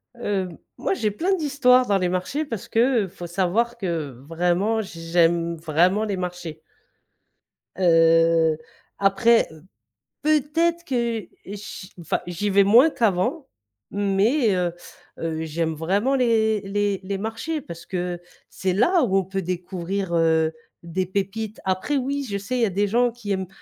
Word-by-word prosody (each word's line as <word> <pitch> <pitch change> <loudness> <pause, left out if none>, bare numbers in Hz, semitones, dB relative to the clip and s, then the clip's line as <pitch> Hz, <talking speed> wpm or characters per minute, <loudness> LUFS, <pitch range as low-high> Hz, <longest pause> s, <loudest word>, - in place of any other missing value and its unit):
Heu, 200 -5 -2 0.3
moi, - - -1
j'ai 220 - 0
plein 350 - 0
d'histoires 270 -6 +3
dans 200 -1 +3
les 180 -1 0
marchés, 185 +12 -2
parce 230 -9 -6
qu'il 230 -2 +2
faut 175 -1 -9
savoir 195 +7 0
que 170 -9 -3 0.2
vraiment, 180 +7 +1
j 190 -5 -9
j'aime 170 0 +3
vraiment 175 +6 +2
les 205 -3 -2
marchés. 175 -3 -5 1.2
Heu, 165 -2 +4 0.4
après, 225 +4 +4
heu, 160 -1 -14 0.6
peut-être 310 +3 +1
que, 235 -5 -1
heu, 195 +3 -11
chi 205 -1 -9
enfin 165 - -1
j'y 180 +4 -2
vais 200 0 +5
moins 235 +10 +6
qu'avant, 240 - 0 0.4
mais, 205 +4 +2
heu 175 -2 0 0.5
heu, 160 -1 -3
j'aime 160 +1 -2
vraiment 200 - 0
les 220 -4 +2
les 200 0 -1
les 195 +1 -3
marchés 225 +10 -3
parce 170 -4 -10
que 180 -1 -3 0.3
c'est 185 -1 -2
là, 335 - +3
où 195 -6 +2
on 195 - +2
peut 195 +1 -3
découvrir, 180 +1 -3
heu, 160 -1 +2 0.3
des 175 +2 -2
pépites. 200 +3 -3
Après 190 +10 0
oui, 280 +2 -1
je 200 - -2
sais, 205 +6 -3
il 245 - 0
y - - +5
a - - 0
des 200 +2 0
gens 240 +3 +2
qui 220 -4 -7
aiment, 190 -2 -1
195 Hz, 160 wpm, -23 LUFS, 175-235 Hz, 1.2 s, moins